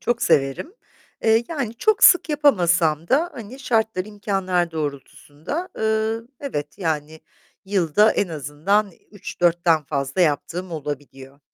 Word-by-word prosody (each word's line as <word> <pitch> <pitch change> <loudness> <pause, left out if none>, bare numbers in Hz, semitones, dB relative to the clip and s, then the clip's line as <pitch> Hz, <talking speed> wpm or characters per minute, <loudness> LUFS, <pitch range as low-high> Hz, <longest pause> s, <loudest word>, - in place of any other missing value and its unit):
çok 240 0 -1
severim. 135 - +1 0.5
Eee, 225 +1 +3
yani, 275 -9 -3
çok 430 - +2
sık 360 - +7
yapamasam 175 - +2
da 320 +6 +2
hani 235 +3 -9
şartlar, 220 -6 0
imkânlar 195 -4 -1
doğrultusunda, 150 - -5
ııı, 220 +1 -1
evet, 150 - -5
yani 160 -3 -3 0.4
yılda 195 +2 +3
en 200 - 0
azından 165 +7 -1 0.2
3-4'ten 175 -5 +1
fazla 140 +3 -2
yaptığım 175 +3 0
olabiliyor. 140 -2 -7
185 Hz, 115 wpm, -22 LUFS, 155-220 Hz, 0.5 s, sık